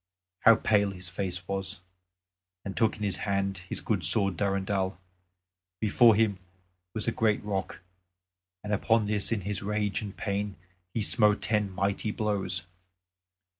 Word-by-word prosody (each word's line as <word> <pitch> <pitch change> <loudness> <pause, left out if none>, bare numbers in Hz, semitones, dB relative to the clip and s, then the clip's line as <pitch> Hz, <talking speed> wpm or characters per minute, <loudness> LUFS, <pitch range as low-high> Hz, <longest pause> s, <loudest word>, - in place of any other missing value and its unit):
how 115 -2 +7
pale 105 -2 +2
his 90 -2 -7
face 90 -1 -4
was! 95 0 -3 0.9
and 95 - -5
took 110 -1 +2
in 105 - -6
his 100 -2 0
hand 100 -1 -1
his - - -3
good 100 -5 -1
sword 95 +3 +5
Durendal. 95 0 -1 0.8
Before 110 +1 +5
him 105 -3 +1 0.6
was 110 - -2
a - - +3
great 110 -2 +1
rock 95 -2 -4 0.8
and 105 0 -3
on 110 +2 +2
this 105 0 0
in 110 -3 0
his 100 +1 -3
rage 105 0 -1
and 100 -2 -7
pain 100 0 -2 0.4
he 110 - -1
smote 105 -1 +4
ten 105 -2 +1
mighty 100 +3 -1
blows. 105 -4 0
100 Hz, 145 wpm, -28 LUFS, 95-105 Hz, 0.9 s, how